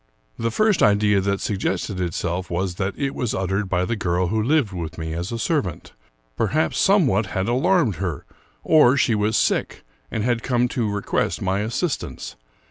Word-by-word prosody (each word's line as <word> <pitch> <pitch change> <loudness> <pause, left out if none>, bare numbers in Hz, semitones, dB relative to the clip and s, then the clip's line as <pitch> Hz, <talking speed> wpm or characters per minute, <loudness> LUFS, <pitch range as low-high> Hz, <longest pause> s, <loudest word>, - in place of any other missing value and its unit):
The 115 - 0
first 215 - +2
idea 105 -1 +4
that 100 +1 -1
suggested 95 -1 -2
itself 90 +1 -2
was 90 +1 -1
that 95 +1 -1
it 140 -1 -2
was 125 -5 -2
uttered 95 +1 -1
by 90 -1 +1
the 115 - -1
girl 90 -3 0
who 110 +1 0
lived 130 -3 +1
with 80 -3 -5
me 80 -1 -4
as 85 +5 -4
a 115 - -2
servant. 110 - -2 0.4
Perhaps 155 +2 0
some 195 -3 +4
what 105 -4 +1
had 95 +1 -2
alarmed 130 - +2
her, 90 -5 -4 0.4
or 140 -4 +5
she 120 - +2
was 105 +1 +1
sick, - - 0 0.3
and 110 - -2
had 120 -1 0
come 125 -1 +1
to 115 -5 -1
request 100 0 -1
my 95 +1 0
assistance. 115 - -3
105 Hz, 180 wpm, -22 LUFS, 95-120 Hz, 0.4 s, or